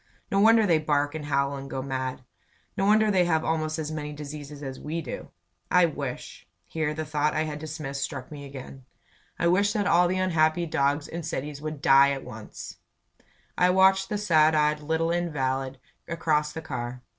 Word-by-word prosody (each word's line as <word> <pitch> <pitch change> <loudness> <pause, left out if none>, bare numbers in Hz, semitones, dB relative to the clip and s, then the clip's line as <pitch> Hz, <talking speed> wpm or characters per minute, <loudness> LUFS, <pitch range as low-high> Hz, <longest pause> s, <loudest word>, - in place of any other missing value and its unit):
"No 195 - +2
wonder 225 +1 +6
they 165 -5 +3
bark 145 -1 0
and 155 -2 -5
howl 140 -1 0
and 135 0 -7
go 130 -1 -4
mad. 130 -1 -3 0.5
No 195 - +1
wonder 215 0 +4
they 185 -2 +3
have 160 -2 +1
almost 155 0 -1
as 155 -1 -3
many 150 -1 -4
diseases 145 0 -8
as 135 -1 -6
we 160 +3 -4
do! 165 - -7 0.4
I 180 -1 +5
wish 140 -5 -6
" - - -49
Here 155 - -2
the 155 0 -3
thought 150 0 0
I 155 - +1
had 150 -1 -5
dismissed 150 -3 -5
struck 130 -3 -5
me 145 -1 -8
agin. 135 -1 -10 0.5
"I - - -1
wish 200 +4 +3
that 205 -1 0
all 175 -2 +4
the 185 +1 -1
unhappy 170 -2 +2
dogs 145 -1 0
in 170 - -5
cities 145 -2 -5
would 155 -1 -6
die 140 -3 +7
at 135 - -5
once!" 110 0 -9 0.8
I 180 - +4
watched 190 +1 +4
the 210 - -1
sad 160 -6 +4
eyed 150 0 +2
little 160 +2 0
invalid 135 -6 -1 0.3
across 155 -3 0
the 160 - -6
car. 125 -4 -5
155 Hz, 190 wpm, -26 LUFS, 140-170 Hz, 0.8 s, die